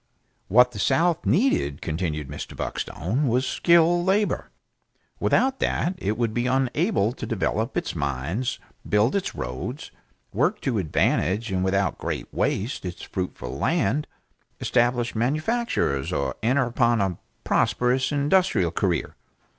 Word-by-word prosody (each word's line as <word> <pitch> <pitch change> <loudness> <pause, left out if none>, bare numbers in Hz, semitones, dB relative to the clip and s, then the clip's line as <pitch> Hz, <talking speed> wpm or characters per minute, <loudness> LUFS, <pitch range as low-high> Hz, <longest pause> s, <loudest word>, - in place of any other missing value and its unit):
What 125 +4 +5
the 105 - -8
South 165 - +2
needed, 100 - +2
continued 80 -3 -3
Mr. 75 - -7
Buckstone, 120 - -2
was 125 +3 +2
skilled 170 0 +4
labor. 200 +3 +1 0.7
Without 265 +1 +2
that 175 - 0
it 105 +2 -1
would 115 -2 0
be 120 +2 0
unable 130 - +1
to 120 - -6
develop 110 0 -1
its - - -2
mines, 75 - -2 0.3
build 105 - +3
its 200 - -2
roads, 65 +2 -5 0.4
work - - +1
to 120 -6 0
advantage 95 +5 +1
and 95 -1 0
without 95 +1 0
great - - -4
waste 110 +8 -1
its 90 -2 -6
fruitful 90 -9 -5
land, 140 +10 +1 0.5
establish 120 0 +1
manufactures 145 - 0
or 65 -1 -1
enter 130 +5 +2
upon 120 -1 +2
a 95 -4 -1 0.2
prosperous 125 +3 +1
industrial 145 - +2
career. 90 -1 -1
115 Hz, 130 wpm, -25 LUFS, 95-140 Hz, 0.7 s, What